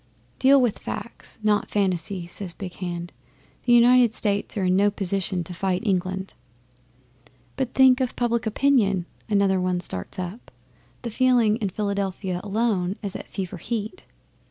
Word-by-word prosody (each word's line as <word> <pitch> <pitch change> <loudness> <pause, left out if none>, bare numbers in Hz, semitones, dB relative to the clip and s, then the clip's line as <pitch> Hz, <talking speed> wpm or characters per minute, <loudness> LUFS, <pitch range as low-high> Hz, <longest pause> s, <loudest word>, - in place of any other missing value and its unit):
'"Deal 275 +1 +6
with 245 -5 +1
facts, 235 - -7
not 210 -1 +2
fancies," 185 -2 -1
says 185 -4 -4
Big 185 -3 -7
Hand. 175 -2 -5 0.5
"The 240 - +4
United 240 -1 +6
States 205 0 -1
are 195 - 0
in 180 0 +3
no 200 +2 +4
position 195 -2 -2
to 180 - -6
fight 185 +2 -1
England." 190 -1 -1 1.2
'"But 265 -2 -3
think 260 -1 +6
of 255 - -1
public 235 -1 0
opinion," 215 -7 +2 0.2
another 200 -2 +2
one 180 -1 0
starts 95 - -6
up. 185 +6 -6 0.5
"The 235 - -4
feeling 240 -3 +3
in 210 -5 -2
Philadelphia 195 -2 -2
alone 205 -3 0
is 200 -2 -4
at - - -7
fever 185 -1 -5
heat." 225 - -4
200 Hz, 150 wpm, -24 LUFS, 185-235 Hz, 1.2 s, Deal